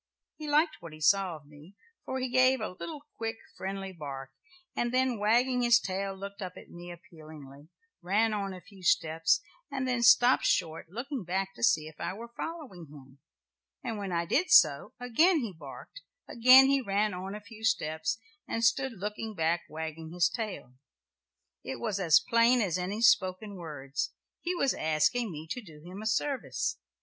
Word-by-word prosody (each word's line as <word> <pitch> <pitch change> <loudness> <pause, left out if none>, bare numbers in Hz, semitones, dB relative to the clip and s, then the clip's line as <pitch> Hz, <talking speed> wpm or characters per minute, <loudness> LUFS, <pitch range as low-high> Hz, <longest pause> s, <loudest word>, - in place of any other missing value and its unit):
He 305 -1 -7
liked 310 +2 +3
what 170 -2 -10
he 155 - -12
saw 185 +3 +3
of 150 -2 -14
me; 150 +6 -16 0.3
for 260 - -3
he 260 0 -1
gave 255 +1 +4
a - - -3
little 290 - -8
quick 225 0 -3 0.2
friendly 195 0 -5
bark, 135 -5 -7 0.4
and 240 0 0
then, 255 -3 +1
wagging 245 +4 +2
his 240 -3 +5
tail, 195 +1 -3
looked 200 +1 -8
up 185 -1 -5
at - - -13
me 175 0 -9
appealingly, 155 -4 -13 0.3
ran 210 +5 +2
on 200 -2 -2
a 185 -1 -9
few 195 -1 -17
steps 165 +2 +2 0.3
and 270 -2 -3
then 250 -2 0
stopped 245 +1 +6
short, 165 -2 0
looking 250 - -5
back 190 +2 -2
to - - -14
see 200 -10 +3
if 155 -1 -12
I - - -3
were 235 +4 -10
following 275 - -7
him, 135 -2 -15 0.6
and 225 -4 -4
when 195 -2 -4
I 170 0 0
did 365 - +1
so, 145 - +5
again 310 +9 +3
he 225 -6 -4
barked, 160 - -11 0.3
again 255 +3 +7
he 275 0 +3
ran 205 -2 0
on 190 +2 -5
a - - -6
few 220 +1 -14
steps, 160 -3 0 0.3
and 230 - -2
stood 260 +3 +2
looking 210 +2 -5
back 165 0 0
wagging 160 0 -6
his 175 -1 +3
tail. 215 - -5 0.9
It 135 - -5
was 215 -4 -2
as 165 -5 +6
plain 235 +1 +4
as 185 -5 0
any 200 +5 -3
spoken 190 0 +3
words; 150 -5 -4 0.3
he 360 +1 -2
was 275 -6 +1
asking 160 +9 +1
me 155 -1 -7
to 250 - -3
do 160 -8 -14
him 185 +3 -8
a 220 - -3
service. 270 +5 -1
200 Hz, 180 wpm, -29 LUFS, 165-240 Hz, 0.9 s, again